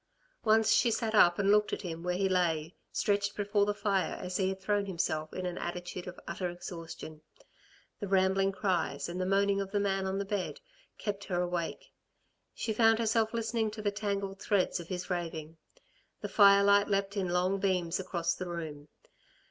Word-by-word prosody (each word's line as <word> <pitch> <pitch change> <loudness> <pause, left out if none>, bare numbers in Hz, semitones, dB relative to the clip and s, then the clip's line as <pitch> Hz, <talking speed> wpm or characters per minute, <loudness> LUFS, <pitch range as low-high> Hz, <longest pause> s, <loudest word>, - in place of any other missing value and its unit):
Once 220 0 +4
she 240 - +4
sat 225 -1 -1
up 175 -5 +6
and 200 0 +3
looked 210 0 +4
at - - -3
him 165 -2 -5
where 180 +1 -1
he 195 0 +2
lay 170 -3 0 0.2
stretched 200 0 0
before 205 0 +1
the 205 - +1
fire 195 -4 0
as 180 0 -3
he 190 -1 +1
had 190 0 -4
thrown 205 +1 0
himself 155 -4 -2
in 185 - -4
an 180 -1 -3
attitude 180 +1 -5
of 180 - -8
utter 180 +1 -3
exhaustion. 165 -3 -8 0.8
The 205 - -4
rambling 195 0 +3
cries, 180 -7 -1
and 175 +2 -4
the 185 - -1
moaning 200 +1 +2
of 195 - -4
the 205 +1 0
man 195 -1 0
on 190 0 -1
the 200 - -2
bed, 195 -2 -3 0.4
kept 200 -1 -4
her 175 -2 -1
awake. 175 -2 -3 0.6
She 220 - -2
found 225 0 +5
herself 225 -1 +1
listening 230 -1 -1
to 215 +1 -7
the 205 - +1
tangled 200 -2 -3
threads 195 -3 +1
of 170 - -8
his 185 0 -5
raving. 165 -2 -4 0.6
The - - -4
firelight 200 0 +6
leapt 200 0 0
in 190 -3 -1
long 180 +2 +1
beams 185 -3 0
across 175 -2 -1
the 185 -1 -6
room. 155 -4 -6
195 Hz, 190 wpm, -31 LUFS, 175-205 Hz, 0.8 s, up